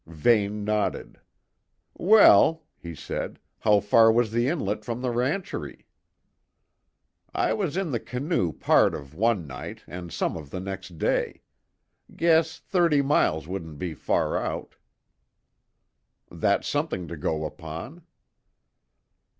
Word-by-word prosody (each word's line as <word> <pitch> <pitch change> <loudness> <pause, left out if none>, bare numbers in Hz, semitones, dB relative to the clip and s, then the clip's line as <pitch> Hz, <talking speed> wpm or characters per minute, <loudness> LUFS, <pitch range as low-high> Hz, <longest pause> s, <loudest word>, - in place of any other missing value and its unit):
Vane 105 +5 +1
nodded. 105 -1 -2 0.7
"Well," 165 - +6 0.2
he 85 -1 -8
said, - - -5 0.2
"how 105 -1 +4
far 115 +3 +5
was 115 -1 +1
the 120 +2 +1
inlet 105 - -2
from 115 +2 -4
the 125 - 0
rancherie?" 135 +11 -3 1.5
"I - - +1
was 185 -6 -2
in 190 -5 -1
the 120 - -1
canoe 125 - -1
part - - +3
of 70 0 -9
one 105 -1 +1
night 65 -2 -8
and 85 -1 -8
some - - -1
of 75 -4 -8
the 90 - -5
next 95 -2 -7
day. - - -1 0.7
Guess 160 -1 +3
thirty 170 -7 +2
miles 80 - +1
wouldn't 85 -5 -6
be 85 +2 -4
far 75 - 0
out." - - -5 1.6
"That's - - 0
something 90 -2 -2
to 85 - -6
go 80 0 -2
upon." 85 - -8
105 Hz, 125 wpm, -26 LUFS, 85-140 Hz, 1.6 s, Well